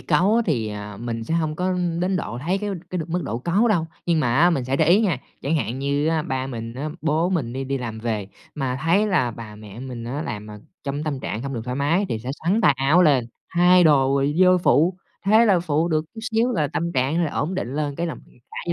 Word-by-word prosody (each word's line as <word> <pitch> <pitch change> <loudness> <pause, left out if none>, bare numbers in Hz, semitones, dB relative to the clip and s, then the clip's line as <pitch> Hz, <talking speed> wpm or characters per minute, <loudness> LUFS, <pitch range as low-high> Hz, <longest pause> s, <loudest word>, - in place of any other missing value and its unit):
cáu 180 +7 +2
á 235 - +3
thì, 115 -9 0
à, 105 0 -7
mình 115 -1 -4
sẽ 160 - -2
hông 155 -2 0
có 185 +2 0 0.3
đến 185 +1 +1
độ 120 -9 -4
thấy 175 +9 -1
cái 205 0 -3 0.2
cái 185 - -2
được 160 0 -4
mức 175 +1 -1
độ 115 - -3
cáu 185 - +2
đâu. 175 -7 +1 0.2
Nhưng 170 -2 +2
mà 120 -3 +1
á 170 +4 +5
mình 135 -7 0
sẽ 130 +2 0
để 160 - +3
ý 185 +5 +6
nha, 205 -6 +1 0.2
chẳng 150 +4 +1
hạn 130 -3 -2
như 140 +2 0
á 160 -1 +1
ba 130 -2 -2
mình 115 -3 -6
á, 140 +4 -4
bố 160 +3 +1
mình 145 -11 -1
đi 135 +1 -3
đi 135 0 -2
làm 115 -3 -5
về 110 -3 -3 0.3
mà 130 -3 -2
thấy 185 +6 +3
là 155 - +1
bà, 110 -2 -9
mẹ 105 +1 -11
mình 125 -3 -6
á 135 +6 -3
làm, 105 -7 -5
ờ, 105 0 -9 0.3
trong 140 +1 -3
tâm 145 -4 -3
trạng 110 -2 -4
hông 135 0 -4
được 115 - -3
thoải 125 +1 -3
mái 165 +8 +1
thì 110 - -2
sẽ 125 +4 -5
xắn 195 +7 +2
tay 145 - +5
áo 140 +7 +4
lên 140 -7 +4 0.3
thay 180 +1 +6
đồ 140 -4 +5
rồi 140 +2 +1
vô 185 0 +6
phụ, 170 +1 +3 0.3
thế 220 +3 +6
là 195 -6 +4
phụ 160 0 0
được 155 -2 +1
chút 225 - -7
xíu 230 +3 +2
là 155 -9 0
tâm 170 +1 -1
trạng 140 +6 +1
là 155 - -2
ổn 165 +6 -1
định 135 -8 -3
lên 145 -1 -2
cái 170 - -1
là 165 - -3 0.4
cả - - -11
gia 170 - 0
150 Hz, 265 wpm, -23 LUFS, 125-175 Hz, 0.4 s, ý